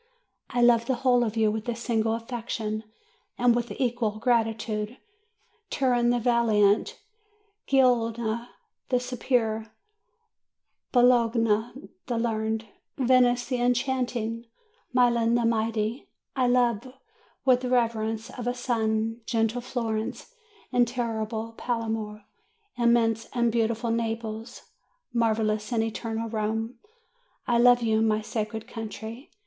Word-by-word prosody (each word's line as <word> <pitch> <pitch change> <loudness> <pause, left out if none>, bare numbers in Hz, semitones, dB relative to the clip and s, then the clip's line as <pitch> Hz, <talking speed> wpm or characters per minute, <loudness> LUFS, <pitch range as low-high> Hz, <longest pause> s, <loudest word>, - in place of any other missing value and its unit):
I 245 0 +1
love 235 -1 +5
the 260 - +1
whole 245 -1 +3
of 225 -1 -3
you, 220 -1 +3
with 220 +2 -4
a 235 - -1
single 225 -1 0
affection 225 -2 -4 0.5
and 240 -1 +4
with 240 0 -1
equal 235 -4 -1
gratitude, 225 -1 0 0.7
Turin 245 -3 +2
the 245 - +3
valiant, 225 -4 +2 0.7
Genoa 235 -3 +2 0.4
the 250 - +3
superb, 230 -3 -1 1.2
Bologna 235 0 +2 0.2
the 240 -3 -1
learned, 220 -1 -1 0.3
Venice 250 -1 +3
the 250 -1 -2
enchanting, 245 -2 -1 0.4
Milan 235 -2 +3
the 240 -1 +2
mighty; 225 +1 -1 0.3
I 255 -2 +2
love 245 -1 +2 0.5
with 255 -2 +4
the 250 - -3
reverence 225 -2 0
of 245 -1 -6
a 245 - 0
son, 225 -2 -1
gentle 225 +1 0
Florence 230 - -3 0.4
and 245 -1 +3
terrible 225 -2 -3
Palermo, 225 -3 -3 0.5
immense 235 -2 +2
and 235 -1 +2
beautiful 230 0 0
Naples, 225 0 -3 0.5
marvellous 220 -2 +1
and 225 -2 +2
eternal 225 0 -3
Rome. 225 +1 -2 0.7
I 240 -1 +2
love 245 0 +6
you, 220 -1 +2
my 215 -1 +2
sacred 220 +1 -4
country! 225 +2 -7
230 Hz, 115 wpm, -26 LUFS, 220-245 Hz, 1.2 s, love